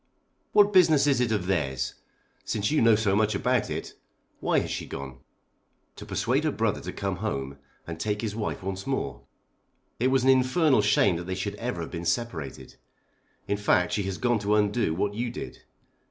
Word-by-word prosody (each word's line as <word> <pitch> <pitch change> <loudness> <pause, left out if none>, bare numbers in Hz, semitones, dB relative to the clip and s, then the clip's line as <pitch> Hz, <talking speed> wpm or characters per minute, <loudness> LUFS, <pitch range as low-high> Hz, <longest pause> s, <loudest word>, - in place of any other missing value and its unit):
"What 205 0 +5
business 160 -6 +5
is 140 -4 +3
it 120 -2 +1
of 105 -5 0
theirs? 70 -8 -1 0.5
Since 105 +2 -1
you 155 - +3
know 115 -1 +6
so 105 -2 +1
much 110 0 +2
about 125 +3 +1
it, - - -5 0.5
why - - +1
has - - -5
she - - -4
gone?" 65 -2 -7 0.8
"To - - -9
persuade - - 0
her - - +1
brother - - -1
to - - -5
come 95 -2 -3
home 70 -9 -4 0.3
and 85 -1 -7
take 105 +4 -1
his 105 -2 -3
wife 110 -3 -3
once 95 +2 -5
more. 70 - -2 0.8
It 125 - +2
was 130 -1 +2
an 135 - +4
infernal 130 0 +3
shame 105 -3 +3
that 85 - -6
they 95 +1 -3
should 100 +2 -3
ever 115 -7 -3
have 80 - -6
been 85 -1 -5
separated. 85 - -3 0.7
In 100 - 0
fact 90 -3 +2
she 105 - +1
has 95 -1 -3
gone 120 -2 +1
to 105 +1 +1
undo 105 -4 +1
what 100 +3 -1
you 120 +3 -2
did. - - -8
105 Hz, 195 wpm, -27 LUFS, 90-120 Hz, 0.8 s, know